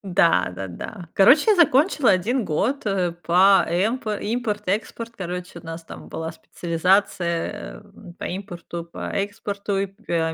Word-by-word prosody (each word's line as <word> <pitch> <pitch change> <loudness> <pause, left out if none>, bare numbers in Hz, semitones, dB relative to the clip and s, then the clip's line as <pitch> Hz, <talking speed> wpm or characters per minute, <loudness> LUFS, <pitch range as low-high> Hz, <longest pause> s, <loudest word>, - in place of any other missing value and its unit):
Да, 165 - +4
да-да, 95 - -7
короче, 280 - +6
я 415 - +4
закончила 300 - +4
1 220 +7 +1
год, 225 - -1
э, 190 -4 +1
по 180 +3 +4
эмпо 215 +5 0
импорту, 210 -3 -2
экспорт, 230 +3 -3
короче, 180 -1 -5
у 165 - -17
нас 165 0 -7
там - - -11
была 160 0 -4
специализация, 170 +1 -1
э, 175 - -15
по - - -4
импорту, 175 -2 -6
по 170 - -7
экспорту 200 0 -2
и, 195 - +1 0.2
э, 165 -1 0
190 Hz, 145 wpm, -23 LUFS, 170-215 Hz, 0.2 s, короче